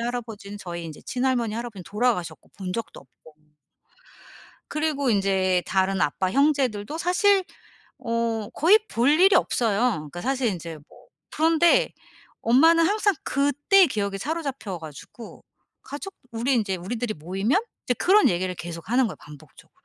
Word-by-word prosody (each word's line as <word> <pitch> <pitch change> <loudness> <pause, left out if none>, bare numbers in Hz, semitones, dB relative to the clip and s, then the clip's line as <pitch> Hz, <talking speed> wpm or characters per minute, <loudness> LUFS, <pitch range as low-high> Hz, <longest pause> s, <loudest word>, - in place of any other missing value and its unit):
할아버지는 225 -4 -5
저희 170 -3 -6
인제 155 -2 -9
친할머니 250 -4 -1
할아버지는 230 -4 -6
돌아가셨고 210 -8 -2
본 185 -2 -5
적도 230 +4 -6
없고 135 +4 -20 1.4
그리고 300 -4 -1
인제 190 -3 +1
다른 190 0 0
아빠 185 +5 0
형제들도 275 -2 +1
사실 370 +3 +3 0.6
어 230 -2 -2
거의 380 +8 +5
볼 240 +4 +1
일이 370 +6 +5
없어요. 225 -4 +1
그니까 175 - -7
사실 265 -1 0
인제 165 -4 -6
뭐 - - -20 0.2
그런데 330 +10 +3 0.5
엄마는 325 +8 +5
항상 410 -2 +1
그때의 290 +7 +3
기억에 200 -5 -2
사로잡혀 275 - -4
가지고 160 +8 -11 0.4
가족 295 +8 -8 0.2
우리 235 +4 0
인제 210 -6 0
우리들이 220 +4 -4
모이면 195 - 0 0.3
이제 250 - +1
그런 400 - +4
얘기를 180 +1 -1
계속하는 175 +10 -1
거예요 - - -7
반복적으로. 150 -1 -16
230 Hz, 340 characters per minute, -24 LUFS, 190-285 Hz, 1.4 s, 거의